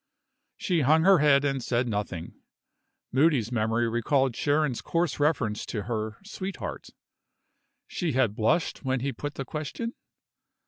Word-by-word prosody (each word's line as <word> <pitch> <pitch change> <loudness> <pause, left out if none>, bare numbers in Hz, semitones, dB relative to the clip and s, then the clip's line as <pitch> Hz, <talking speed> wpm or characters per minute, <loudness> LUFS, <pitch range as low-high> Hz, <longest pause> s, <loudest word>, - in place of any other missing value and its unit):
She 175 -5 0
hung 155 +4 +4
her 190 -1 +6
head 145 -1 +4
and 135 -2 0
said 125 +1 0
nothing. 100 -6 -4 0.8
Moody's 130 -4 +3
memory 115 0 +1
recalled 120 +2 +1
Sharon's 145 -3 +1
coarse 165 -4 -1
reference 140 -8 +1
to 105 - -3
her 110 -1 -3
"sweetheart." 195 -2 -6 1.0
She 170 -5 -2
had 125 -5 +2
blushed 115 +12 0
when 130 -1 0
he 140 +1 -2
put 145 0 -6
the 135 - -4
question? 155 - -4
135 Hz, 135 wpm, -27 LUFS, 115-155 Hz, 1.0 s, her